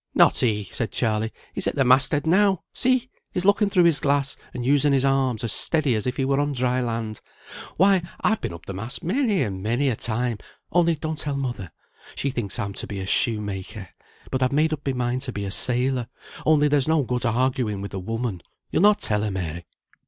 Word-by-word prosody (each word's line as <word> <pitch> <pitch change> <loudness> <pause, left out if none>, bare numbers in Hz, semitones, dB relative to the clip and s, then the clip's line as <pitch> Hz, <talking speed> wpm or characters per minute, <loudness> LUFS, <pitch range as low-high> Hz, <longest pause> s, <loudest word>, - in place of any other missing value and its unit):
"Not - - +5
he!" 105 -5 0
said 115 - -2
Charley. 110 -1 0 0.2
"He's - - -1
at - - -1
the 135 -2 +2
mast 130 +1 +4
head 145 +1 0
now. 190 +2 +3
See! 255 0 +1 0.2
he's 180 - -2
looking 205 +1 +4
through 180 -3 +4
his 170 -3 +4
glass, 140 -1 +1 0.2
and 120 -1 -5
using 145 +1 +3
his 135 0 +2
arms 130 -3 +1
as 115 - -1
steady 150 0 0
as 110 +2 -1
if 125 - -2
he 135 - 0
were 135 +1 +1
on 145 0 0
dry 125 -1 0
land. 115 -3 -3 0.6
Why, 195 +1 +5 0.2
I've 220 - +1
been - - -3
up 85 0 -10
the 95 - -6
mast, 110 - -6
many 205 - +1
and 95 -5 -4
many 120 +7 +1
a 120 - 0
time; 115 0 -1 0.3
only 170 -1 +3
don't 155 0 -4
tell 145 -2 -2
mother. 120 -10 -4 0.4
She 140 - -1
thinks 115 -7 -2
I'm 100 -4 -3
to - - -5
be 100 - -5
a 95 - -4
shoemaker, 100 -3 -1 0.4
but 130 - -1
I've 130 - +2
made 155 +3 +2
up 150 - -4
my 135 - +1
mind 125 0 -1
to 135 -2 +1
be 100 -3 -4
a 95 - -4
sailor; 125 +2 +1 0.4
only 150 -1 +5
there's 145 -2 +2
no 160 -2 +3
good 125 0 -2
arguing 120 -3 0
with 100 +1 -7
a 95 - -3
woman. 115 -1 -3 0.3
You'll - - +1
not 205 +1 +5
tell 105 -1 +3
her, 105 - -1
Mary?" 85 -3 -5
130 Hz, 220 wpm, -24 LUFS, 110-145 Hz, 0.6 s, Not